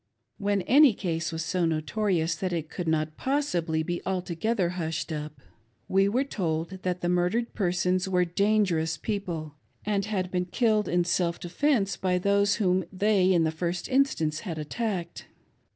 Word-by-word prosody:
When 200 -1 0
any 275 -1 +6
case 165 -4 -2
was 165 0 -3
so 185 0 0
notorious 165 +1 0
that 180 +3 -3
it 160 -2 -3
could 175 -3 -4
not 155 -1 0
possibly 175 - 0
be 175 +2 -3
altogether 185 +2 -1
hushed 165 -2 -3
up, 150 -1 -5 0.5
we 195 +1 +3
were 250 +6 +1
told 165 - -2
that 180 -1 -2
the 175 - -1
murdered 180 +7 +1
persons 185 -1 0
were 180 -1 +2
dan 205 +5 +2
gerous 160 -3 -1
people 170 -8 -4 0.3
and 205 -1 0
had 190 -4 -2
been 180 -1 0
killed 215 +2 +1
in 175 0 +2
self 170 -1 0
defence 200 - 0
by 185 -1 +1
those 200 +2 +2
whom 185 -3 +1
they 195 -1 +3
in 170 -3 +4
the 160 - +1
first 170 +2 -3
instance 255 - +1
had 170 -6 -5
attacked. 185 +3 -4
180 Hz, 165 wpm, -27 LUFS, 165-200 Hz, 0.5 s, any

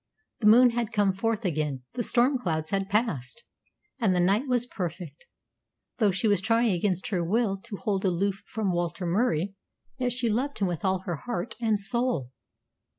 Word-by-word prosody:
The 210 - +2
moon 245 +3 +7
had 235 -1 -2
come 205 -3 +2
forth 225 +2 -1
again, 150 -6 -1
the 245 - -2
storm 250 +3 +2
clouds 160 -7 -2
had 195 0 -1
passed, 210 - -1 0.6
and 205 -6 +2
the - - +2
night 200 +9 +2
was 245 -2 +1
perfect. 175 - -6 0.7
Though 215 -3 +4
she 195 +4 0
was 205 -4 +3
trying 225 +2 +2
against 185 0 -1
her 185 -5 0
will 205 +3 +1
to 205 +1 -8
hold 195 -2 -1
aloof 195 +2 0
from 215 -4 -1
Walter 175 +1 -2
Murie, 185 -1 +1 0.5
yet 250 -1 0
she 245 0 0
loved 255 +6 -1
him 200 - +1
with 175 -3 -4
all 190 -1 +1
her 175 -4 -4
heart 215 - -4
and 220 -3 +2
soul. 235 - 0
200 Hz, 180 wpm, -27 LUFS, 175-235 Hz, 0.7 s, moon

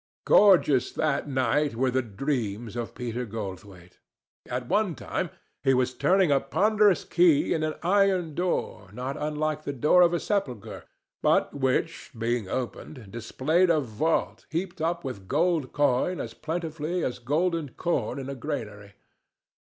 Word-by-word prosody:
Gorgeous 175 - +5
that 150 -2 0
night 135 +1 +1
were 130 +2 +1
the 130 +1 +1
dreams 115 -2 -3
of 120 -1 -5
Peter 120 0 -3
Goldthwaite. 95 -5 -8 0.5
At 125 0 -3
one 205 -2 +1
time 180 - -3 0.3
he 135 -2 +4
was 130 0 +1
turning 185 0 +3
a 140 - +4
ponderous 205 +6 +3
key 330 - +3
in 160 - -1
an 155 0 -1
iron 185 -3 +2
door 170 - -2
not 130 +4 -4
unlike 155 0 -2
the 140 - -3
door 150 +7 +4
of 175 -1 +6
a - - 0
sepulchre, 140 - -3 0.4
but - - +2
which, 140 +4 -1
being 115 -3 -1
opened, 125 -2 -5
disclosed 155 - +1
a 165 -2 +4
vault 145 +5 -1
heaped 175 +1 -4
up 170 +2 -1
with 120 -9 -6
gold 160 - +1
coin 145 +5 +1
as 115 - -5
plentifully 165 +2 -3
as 125 - -2
golden 155 +4 0
corn 130 -5 -2
in 135 -1 -5
a 140 - -4
granary. 110 -7 -6
145 Hz, 150 wpm, -27 LUFS, 120-170 Hz, 0.5 s, of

